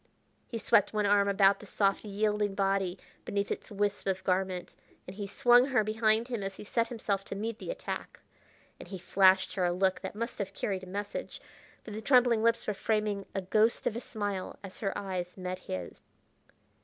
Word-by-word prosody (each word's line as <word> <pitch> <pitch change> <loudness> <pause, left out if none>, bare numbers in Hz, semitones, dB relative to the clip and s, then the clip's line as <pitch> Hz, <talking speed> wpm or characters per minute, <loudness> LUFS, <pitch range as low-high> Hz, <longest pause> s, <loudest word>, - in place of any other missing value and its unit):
He 235 - -4
swept 210 -1 +3
one 210 -1 +1
arm 200 0 +4
about 195 0 +4
the 210 - -12
soft, 195 0 +1
yielding 210 -1 0
body 195 -2 +1 0.3
beneath 200 0 -2
its - - -4
wisp 205 -1 -1
of 190 -1 0
garment, 185 -1 -1 0.3
and 185 - -9
he 205 -1 -4
swung 245 +3 +5
her 250 -5 +3
behind 220 +1 +2
him 240 -4 -3
as 195 0 -4
he - - -9
set 230 +2 0
himself 210 -4 -2
to - - -5
meet 220 +2 -4
the - - -7
attack. - - -5 0.6
And - - -10
he 195 - -6
flashed 185 0 +4
her 185 -1 0
a 175 - +2
look 185 +1 +1
that - - -6
must 230 +2 -4
have 195 -1 -4
carried 195 -3 -2
a 185 - -10
message, 205 +2 -5 0.4
for 220 - -9
the 215 +1 -5
trembling 245 -2 +4
lips 230 +1 +2
were 210 - 0
framing 210 -1 -1
a 195 - -1
ghost 215 +5 +2
of 220 - 0
a - - -2
smile 205 -5 -4
as 190 -1 -9
her 195 -3 -1
eyes 185 -2 -4
met 185 0 -4
his. 90 -2 -6
200 Hz, 200 wpm, -30 LUFS, 190-220 Hz, 0.6 s, swung